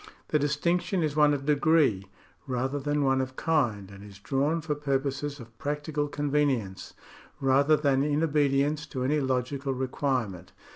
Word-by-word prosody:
The 150 Hz, -, +2 dB
distinction 170 Hz, +5 st, 0 dB
is 150 Hz, -2 st, -1 dB
one 150 Hz, -1 st, +5 dB
of 140 Hz, -1 st, -2 dB
degree, 145 Hz, -9 st, +2 dB, 0.4 s
rather 130 Hz, +2 st, -1 dB
than 145 Hz, +1 st, 0 dB
one 135 Hz, -1 st, +2 dB
of 130 Hz, 0 st, -5 dB
kind, 120 Hz, -13 st, 0 dB
and 100 Hz, 0 st, -12 dB
is 100 Hz, -1 st, -12 dB
drawn 140 Hz, +9 st, 0 dB
for 155 Hz, -1 st, -2 dB
purposes 140 Hz, 0 st, -2 dB
of 115 Hz, -1 st, -12 dB
practical 145 Hz, +1 st, -2 dB
convenience, 145 Hz, -9 st, -1 dB, 0.4 s
rather 140 Hz, +3 st, +4 dB
than 140 Hz, -2 st, +2 dB
in 150 Hz, +2 st, +1 dB
obedience 145 Hz, 0 st, +1 dB
to 130 Hz, -3 st, -4 dB
any 150 Hz, +4 st, +1 dB
logical 135 Hz, +1 st, -1 dB
requirement. 125 Hz, -8 st, -2 dB
140 Hz, 150 wpm, -27 LUFS, 130-150 Hz, 0.4 s, one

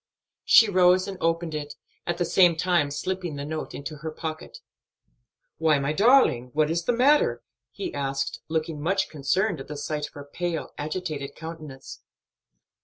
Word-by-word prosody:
She 225 Hz, -, +7 dB
rose 185 Hz, -1 st, +4 dB
and 195 Hz, -, -5 dB
opened 165 Hz, 0 st, 0 dB
it, 150 Hz, -1 st, -5 dB, 0.3 s
at 175 Hz, 0 st, -1 dB
the 175 Hz, -, 0 dB
same 175 Hz, 0 st, +5 dB
time 170 Hz, -3 st, +1 dB
slipping 180 Hz, +2 st, -3 dB
the 140 Hz, 0 st, -5 dB
note 155 Hz, +1 st, -5 dB
into 150 Hz, +2 st, -6 dB
her 155 Hz, +2 st, -5 dB
pocket. 155 Hz, 0 st, -6 dB, 1.0 s
"Why, 160 Hz, -2 st, +4 dB
my 140 Hz, +2 st, -1 dB
darling, 200 Hz, -, +4 dB
what 155 Hz, +1 st, +2 dB
is 170 Hz, +1 st, -1 dB
the -, -, +3 dB
matter?" 270 Hz, +5 st, +3 dB, 0.3 s
he 370 Hz, -3 st, -6 dB
asked, 135 Hz, 0 st, -2 dB
looking 160 Hz, -1 st, -2 dB
much 190 Hz, +5 st, 0 dB
concerned 165 Hz, +5 st, 0 dB
at 135 Hz, -, -8 dB
the 150 Hz, -, -6 dB
sight 150 Hz, 0 st, -3 dB
of -, -, -20 dB
her 145 Hz, -1 st, -9 dB
pale, 170 Hz, +2 st, -4 dB
agitated 150 Hz, -2 st, -4 dB
countenance. 155 Hz, -4 st, -9 dB
160 Hz, 165 wpm, -26 LUFS, 145-180 Hz, 1.0 s, She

